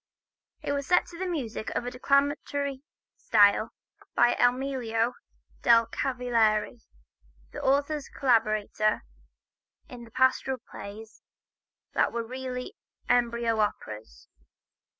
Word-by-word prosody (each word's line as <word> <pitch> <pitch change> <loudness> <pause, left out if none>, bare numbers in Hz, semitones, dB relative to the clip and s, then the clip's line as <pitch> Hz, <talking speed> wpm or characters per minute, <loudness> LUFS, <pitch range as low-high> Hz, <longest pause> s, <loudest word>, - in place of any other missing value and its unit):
It - - -2
was 280 -1 -2
set 360 -1 +4
to 350 +2 -5
music 250 -11 -3
of - - -1
a 245 - -3
declamatory 280 +1 0 0.4
style 210 0 +4 0.5
by 240 - +5
Emilio 245 -2 +1 0.5
del 230 -1 +6
Cavalieri, 235 -3 0 0.7
the - - -7
author's 285 +2 +1
collaborator 215 -4 +1 0.8
in 250 -6 -10
the 230 - -13
pastoral 260 +2 +2
plays 215 +2 -10 0.7
that - - +2
were 235 -1 -3
really 255 +1 -5 0.4
embryo 235 -2 +2
operas. 110 - -4
245 Hz, 100 wpm, -28 LUFS, 225-270 Hz, 0.8 s, del